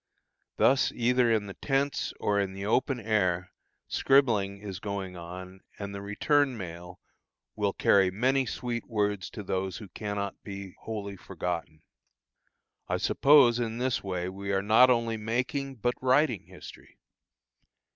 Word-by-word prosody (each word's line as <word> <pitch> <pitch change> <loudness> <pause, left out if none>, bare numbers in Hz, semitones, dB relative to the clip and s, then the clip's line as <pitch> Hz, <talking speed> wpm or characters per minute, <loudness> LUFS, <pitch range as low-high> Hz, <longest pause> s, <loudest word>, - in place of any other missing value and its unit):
Thus 135 +1 +4
either 125 0 +2
in 110 -2 +1
the 100 - -7
tents 140 +4 -1
or 100 0 +1
in 95 -1 -1
the 100 +1 -6
open 125 +4 +1
air, 95 -5 0 0.4
scribbling 110 -8 +2
is 100 -3 -7
going 100 -2 -4
on, 90 +2 -9 0.2
and 100 -1 -6
the 100 - -6
return 130 +6 +1
mail 90 -2 -8 0.6
will - - 0
carry 95 -2 +4
many 130 +7 +1
sweet 120 0 -4
words 105 -4 -1
to 105 - -8
those 95 -1 -2
who 105 -4 -10
cannot 100 +1 -4
be 100 -2 -8
wholly 100 -3 -5
forgotten. 85 -4 -5 1.0
I - - 0
suppose 135 -5 +5
in 115 -1 -2
this 125 0 -1
way 90 -2 -3
we 100 +1 -5
are 95 0 +1
not 110 +5 +6
only 115 -2 +1
making, 125 +5 -2
but 120 +1 0
writing 130 -4 +2
history. - - -13
105 Hz, 145 wpm, -28 LUFS, 95-125 Hz, 1.0 s, not